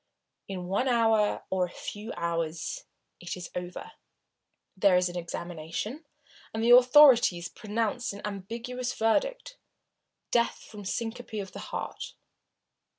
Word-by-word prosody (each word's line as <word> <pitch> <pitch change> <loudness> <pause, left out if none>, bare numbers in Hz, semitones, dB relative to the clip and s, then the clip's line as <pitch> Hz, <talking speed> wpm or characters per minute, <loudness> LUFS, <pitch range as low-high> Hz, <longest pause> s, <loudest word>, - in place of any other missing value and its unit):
In 185 -2 -5
one 200 +8 0
hour, 225 -4 +3
or 190 -1 +2
a - - -9
few 210 +5 -7
hours, 165 -1 -2 0.3
it 175 +1 -5
is 180 - -8
over. 180 - -6 0.8
There 190 -1 +5
is 180 0 +2
an 175 - -8
examination, 175 - -5 0.5
and 220 0 -2
the 235 - +5
authorities 250 - +6
pronounce 225 +2 -2
an 200 0 -9
ambiguous 235 +5 -4
verdict - - 0 0.7
death 235 -1 +1
from 210 - -11
a 205 - -9
syncope 230 +3 -4
of 195 -2 -6
the - - -8
heart. - - -5
210 Hz, 130 wpm, -28 LUFS, 180-240 Hz, 0.8 s, authorities